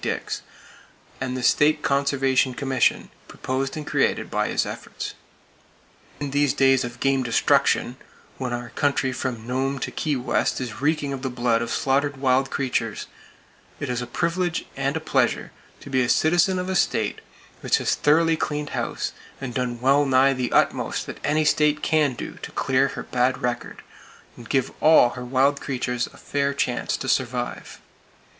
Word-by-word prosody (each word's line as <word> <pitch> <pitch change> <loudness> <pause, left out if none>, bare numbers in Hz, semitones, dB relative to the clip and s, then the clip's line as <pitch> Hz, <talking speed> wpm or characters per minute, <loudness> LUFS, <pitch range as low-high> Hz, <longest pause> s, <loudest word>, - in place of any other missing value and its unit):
Dix, - - -3 0.8
and 130 0 -2
the 125 - -4
State 150 +3 +3
Conservation 135 -2 +1
Commission 135 -1 +1 0.2
proposed 135 +3 -3
and 150 - -5
created - - 0
by - - 0
his - - 0
efforts. - - -6 1.1
In 145 -2 -4
these 145 -1 +2
days 135 -1 +4
of 120 0 -7
game 135 -1 +2
destruction, 130 +1 +2 0.4
when 130 -2 -3
our 120 0 -4
country 140 -1 0
from 125 -3 -4
Nome 135 +3 -1
to - - -4
Key 150 -2 -1
West 125 -1 0
is 120 -2 -6
reeking 145 -1 0
with 135 -1 -4
the 130 - -2
blood 120 -2 +1
of 120 - -3
slaughtered 140 +1 0
wild 130 0 +2
creatures, 120 -6 -2 0.7
it 145 - -4
is 125 0 -1
a 125 - -5
privilege 170 +6 -1
and 140 +2 -1
a - - -2
pleasure 160 - 0 0.3
to - - -10
be 130 -1 +3
a 120 - 0
citizen 175 +6 +3
of 180 0 -3
a 190 - -2
state - - 0 0.4
which - - +2
has - - 0
thoroughly 165 +2 +3
cleaned 150 -2 -3
house, - - -2 0.3
and 130 -3 -5
done 125 -1 -2
well 135 +3 +4
nigh 135 0 +4
the 125 -2 -2
utmost - - +1
that - - -8
any 155 +1 +1
state 150 0 +2
can 150 -5 +2
do - - -7
to - - -6
clear - - +2
her - - -6
bad 125 +1 0
record, 120 -1 -3 0.5
and 120 -2 -12
give 135 -2 +1
all 155 -6 +7
her 125 +1 -7
wild 135 +3 +2
creatures 125 -2 -2
a - - -17
fair 140 -1 -1
chance 125 -3 -1
to 135 - -6
survive. 125 -2 -2
135 Hz, 170 wpm, -24 LUFS, 125-145 Hz, 1.1 s, all